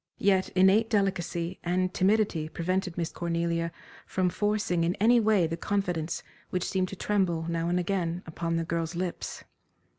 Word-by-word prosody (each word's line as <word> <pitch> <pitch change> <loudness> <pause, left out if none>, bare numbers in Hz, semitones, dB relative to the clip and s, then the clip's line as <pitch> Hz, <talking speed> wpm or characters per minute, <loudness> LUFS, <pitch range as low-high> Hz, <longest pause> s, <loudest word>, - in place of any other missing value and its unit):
Yet 190 -1 +2
innate 195 +4 +5
delicacy 185 -4 0
and 180 +1 0
timidity 190 -5 +2
prevented 180 +1 -2
Miss 170 -1 -1
Cornelia 170 0 -1 0.4
from 185 -1 +1
forcing 205 -4 0
in 170 +2 +1
any 235 +4 +5
way 215 -5 +3
the 165 +1 -2
confidence 175 -4 -1 0.3
which 180 -2 -1
seemed 185 -1 0
to - - -6
tremble, 180 -5 0
now 170 0 -1
and 175 +1 +2
again, 175 -1 -1
upon 165 +1 -3
the 165 0 0
girl's 165 0 -2
lips. 180 0 -4
180 Hz, 155 wpm, -28 LUFS, 170-195 Hz, 0.4 s, innate